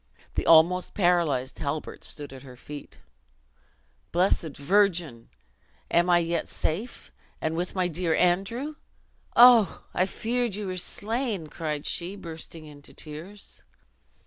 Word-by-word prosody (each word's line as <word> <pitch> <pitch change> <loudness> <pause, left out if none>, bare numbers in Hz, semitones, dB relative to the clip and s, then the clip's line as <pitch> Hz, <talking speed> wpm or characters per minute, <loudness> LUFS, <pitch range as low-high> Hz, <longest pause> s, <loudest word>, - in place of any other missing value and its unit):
The - - -2
almost 170 +3 +5
paralyzed 170 -9 +1
Halbert 150 +2 -4
stood 145 -2 -6
at 130 - -10
her 130 -2 -12
feet. 145 +3 -10 1.1
"Blessed 170 -4 +1
Virgin! 165 - +1 0.6
am 175 +1 +3
I 175 - +6
yet 170 -1 -1
safe, 200 +11 -4 0.3
and 160 +1 -2
with 175 +3 -3
my 185 -1 +1
dear 170 -1 0
Andrew! 215 +12 0 0.6
Oh! 240 -4 +7
I 185 - +2
feared 235 0 -1
you 210 0 -4
were 185 -1 -4
slain!" 215 0 -2
cried 150 -2 -4
she, 180 +3 -2
bursting 165 -3 -9
into 145 -1 -12
tears. 165 +7 -9
175 Hz, 125 wpm, -27 LUFS, 155-195 Hz, 1.1 s, Oh